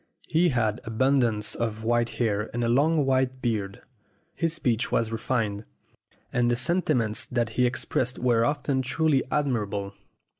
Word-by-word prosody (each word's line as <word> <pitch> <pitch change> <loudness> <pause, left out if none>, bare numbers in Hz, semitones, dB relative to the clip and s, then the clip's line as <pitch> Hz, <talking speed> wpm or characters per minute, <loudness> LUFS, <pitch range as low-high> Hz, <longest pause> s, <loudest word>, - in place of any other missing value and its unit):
He 170 +2 +3
had 115 -4 0
abundance 115 -2 +1
of 110 -2 -3
white 120 +1 +1
hair 105 -3 0
and 120 - 0
a - - +1
long 145 +4 +3
white 130 -1 +1
beard. 105 -6 -2 0.5
His 165 -1 -1
speech 125 -7 -1
was 115 -1 +1
refined, 115 -3 -1 0.7
and 120 -1 +2
the 120 - +2
sentiments 120 -5 +1
that 120 -2 -1
he 125 +3 +2
expressed 125 0 -2
were 120 -2 +2
often 140 0 0
truly 140 +1 +1
admirable. 105 -8 -1
120 Hz, 145 wpm, -26 LUFS, 110-135 Hz, 0.7 s, He